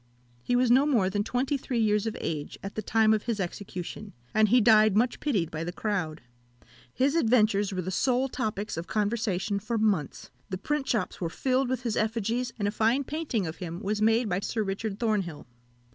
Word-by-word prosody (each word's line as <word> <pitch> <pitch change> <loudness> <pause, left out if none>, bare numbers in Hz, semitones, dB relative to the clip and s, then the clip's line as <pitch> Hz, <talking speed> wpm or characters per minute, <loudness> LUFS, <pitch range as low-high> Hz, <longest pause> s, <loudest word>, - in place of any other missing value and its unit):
He 245 - 0
was 245 -1 +3
no 270 +4 +5
more 215 -10 +2
than 205 +1 0
twenty 255 +5 0
three 255 -2 -3
years 210 -1 +2
of 220 - -3
age 150 -3 -4
at 195 - -5
the 215 - -3
time 220 0 +3
of 215 - -1
his 230 -3 -1
execution, 190 +2 -6 0.2
and 215 -1 +4
he 250 +4 +6
died 215 -2 +5
much 240 +2 +1
pitied 195 - 0
by 160 +1 -4
the 175 - -3
crowd. 180 -6 -2 0.7
His 270 - +1
adventures 215 - +3
were 185 -1 -3
the 185 - -3
sole 255 +6 +1
topics 215 -6 -3
of 165 - -5
conversation 205 -2 -1
for 225 +3 -2
months; 200 -10 -1 0.2
the 185 - -3
print 285 +7 -2
shops 225 -3 -1
were 170 - -1
filled 260 +7 0
with 255 -1 -2
his 230 -3 -1
effigies, 230 +3 -1
and 205 -2 -1
a - - 0
fine 225 +6 +2
painting 285 - -2
of 160 0 -5
him 170 -2 -6
was 210 0 -2
made 225 +2 +3
by 180 -1 0
Sir 220 +2 -2
Richard 195 +1 -3
Thornhill. 205 -9 -1
215 Hz, 205 wpm, -28 LUFS, 195-240 Hz, 0.7 s, he